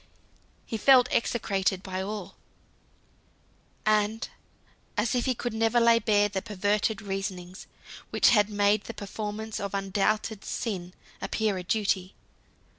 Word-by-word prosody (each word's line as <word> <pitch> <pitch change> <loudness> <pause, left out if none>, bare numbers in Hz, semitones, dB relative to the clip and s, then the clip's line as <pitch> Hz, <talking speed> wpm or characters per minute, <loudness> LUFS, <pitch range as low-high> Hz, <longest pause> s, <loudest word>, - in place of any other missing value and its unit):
He 225 - -3
felt 255 +2 +6
execrated 195 -5 0
by 185 -1 -4
all; 195 -1 -5 1.5
and 215 +1 +2 0.7
as 215 +2 +1
if 245 -1 +1
he 260 -2 +1
could 240 0 -3
never 225 +1 +2
lay 230 0 +5
bare 205 -2 +3
the 195 -2 -3
perverted 210 +1 0
reasonings 195 -2 -5 0.4
which - - +4
had 210 -3 +4
made 205 0 +2
the - - -7
performance 215 +1 -5
of 200 -1 -3
undoubted 200 +2 0
sin 185 -6 -4 0.3
appear 215 -3 0
a - - -6
duty. 190 -1 0
210 Hz, 125 wpm, -28 LUFS, 195-220 Hz, 1.5 s, felt